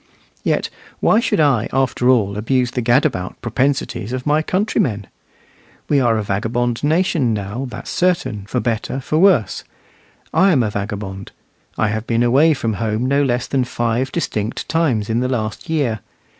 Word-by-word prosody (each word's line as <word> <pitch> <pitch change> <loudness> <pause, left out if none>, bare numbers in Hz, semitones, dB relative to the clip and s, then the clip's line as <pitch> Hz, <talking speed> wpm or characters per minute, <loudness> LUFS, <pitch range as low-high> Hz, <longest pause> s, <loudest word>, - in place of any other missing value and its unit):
Yet - - 0 0.3
why 215 - +4
should 230 -7 0
I, 135 -8 +3
after 130 -1 +1
all, 105 -6 +3
abuse 125 +3 0
the 125 - -2
gadabout 120 -6 +1
propensities 130 -2 -1
of 130 0 -4
my 150 +1 +3
countrymen? 155 - 0 0.8
We 145 - +4
are 120 -3 +2
a 110 - -1
vagabond 115 +5 -1
nation 155 -6 +2
now, 105 +6 -4
that's 120 0 -7
certain, 170 - 0
for 125 - -1
better 120 +2 -2
for 155 +4 -1
worse. 170 - +3 0.7
I 190 -1 +4
am 130 -5 +3
a 105 - -1
vagabond; 100 -2 -5 0.4
I 110 - +1
have 110 +2 -3
been 115 0 +2
away 145 +6 +4
from 115 -4 -2
home 110 +2 -1
no 140 +2 +2
less 125 -3 0
than 135 -2 0
five 120 +1 -1
distinct 110 -9 -3
times 140 -11 +1
in 115 +1 0
the 125 +1 0
last 110 +5 -3
year. 140 -9 0
125 Hz, 165 wpm, -19 LUFS, 110-140 Hz, 0.8 s, why